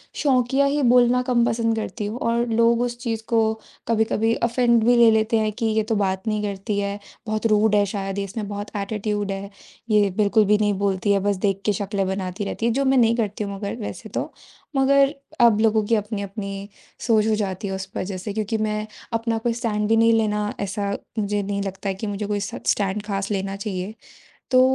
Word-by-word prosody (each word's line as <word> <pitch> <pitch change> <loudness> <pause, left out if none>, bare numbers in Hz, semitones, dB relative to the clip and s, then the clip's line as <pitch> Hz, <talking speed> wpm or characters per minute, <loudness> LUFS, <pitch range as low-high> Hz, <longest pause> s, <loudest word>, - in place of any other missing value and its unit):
शोंकिया 265 -1 +2
ही 285 +1 +1
बोलना 250 0 +5
कम 235 -1 +4
पसंद 230 -1 +1
करती 220 -1 -4
हूँ 220 +4 -4
और 235 +1 +1
लोग 230 +1 +3
उस 240 -1 -2
चीज़ 225 -2 -2
को 225 -1 +3 0.4
कभी-कभी 225 0 +2
ऑफेंड 235 -1 +3
भी 245 +1 +5
ले 235 -1 +7
लेते 220 +1 +2
हैं 215 0 0
कि 230 +1 -3
ये 220 0 +2
तो 220 0 -1
बात 190 +1 -1
नहीं 215 -1 0
करती 200 +1 -2
है, 200 0 -2 0.3
बहुत 215 +1 -2
रूड 215 0 +3
है 205 -1 +4
शायद, 195 -1 -3
इसमें 200 +2 -4
बहुत 205 +1 -6
एटीट्यूड 205 0 -2
है, 195 - -3 0.5
ये 210 -2 +4
बिल्कुल 210 +1 +4
भी 210 +1 +4
नहीं 205 -1 +2
बोलती 200 0 +1
है, 200 - +3
बस 200 +1 +1
देख 195 0 0
के 210 - +3
शक्लें 200 0 -2
बनाती 190 0 -3
रहती 225 - -3
है, 235 - +3
जो 275 +4 +1
मैं 265 0 +3
नहीं 230 -1 +4
करती 210 -2 -2
हूँ 200 - -4
मगर 200 0 -4
वैसे 225 -3 -7
तो। - - -3 0.4
मगर 275 +1 +4 0.3
अब 225 -3 +6
लोगों 220 -1 +3
की 230 - +2
अपनी-अपनी 200 -1 -4 0.4
सोच 220 -1 +4
हो 220 - +2
जाती 195 -1 -3
है 190 - -3
उस 190 0 -6
वजह 185 0 -3
से 200 +2 -5
क्योंकि 220 +1 -1
मैं 215 0 -1 0.3
अपना 230 0 0
कोई 230 +1 -1
स्टैंड 210 -3 -1
भी 225 - +3
नहीं 230 0 +5
लेना 210 -1 +1
ऐसा 200 0 -2 0.3
मुझे 205 0 0
नहीं 200 0 -2
लगता 195 0 -4
है 190 - -2
कि 215 +2 -5
मुझे 205 +1 -3
कोई 205 -1 -1
स 200 - -5
स्टैंड 200 0 +1
ख़ास 195 -1 -3
लेना 195 0 -2
चाहिए। 200 0 -4 0.6
तो 255 0 +6
210 Hz, 215 wpm, -23 LUFS, 200-230 Hz, 0.6 s, ले